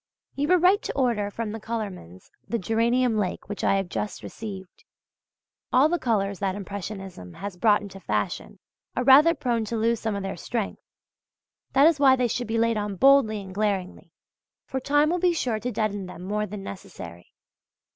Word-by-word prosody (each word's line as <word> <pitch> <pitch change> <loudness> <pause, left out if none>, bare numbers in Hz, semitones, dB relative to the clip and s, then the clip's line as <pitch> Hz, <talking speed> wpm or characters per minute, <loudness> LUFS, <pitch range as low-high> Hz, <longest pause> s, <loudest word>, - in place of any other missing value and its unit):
You 285 +1 -1
were 365 +2 +5
right 370 +4 +4
to - - -4
order 235 -6 +1
from 220 +1 -4
the 225 - -5
colourman's 200 - -6 0.2
the 235 - 0
geranium 230 +3 +1
lake 190 -3 -3
which 205 - -5
I - - +3
have 195 -1 -1
just 205 +4 -4
received. 195 - -8 0.9
All 270 +5 +5
the 350 +1 0
colours 200 -5 0
that 195 -2 -1
Impressionism 195 - -7
has 200 -2 -6
brought 205 +3 +3
into 195 -1 -9
fashion, - - -3 0.4
are 250 - 0
rather 290 +6 +7
prone 240 -5 -1
to 230 +2 -3
lose 230 +1 +1
some 220 -2 -2
of 200 - -3
their 195 - -4
strength. 230 -4 -3 0.9
That 275 +2 +6
is 320 -2 +4
why 270 -2 +6
they 250 -1 +1
should 240 +1 -3
be 225 +1 -1
laid 230 0 +2
on 205 -1 -2
boldly 225 -3 +4
and 190 -1 -10
glaringly; 195 -3 -2 0.5
for 265 - -3
time 290 +3 +2
will 355 - 0
be 355 0 +3
sure 240 -9 -1
to 245 +4 -3
deaden 205 -4 -2
them 180 -1 -9
more 210 +2 -2
than 200 0 -7
necessary. 175 - -10
215 Hz, 185 wpm, -25 LUFS, 195-250 Hz, 0.9 s, rather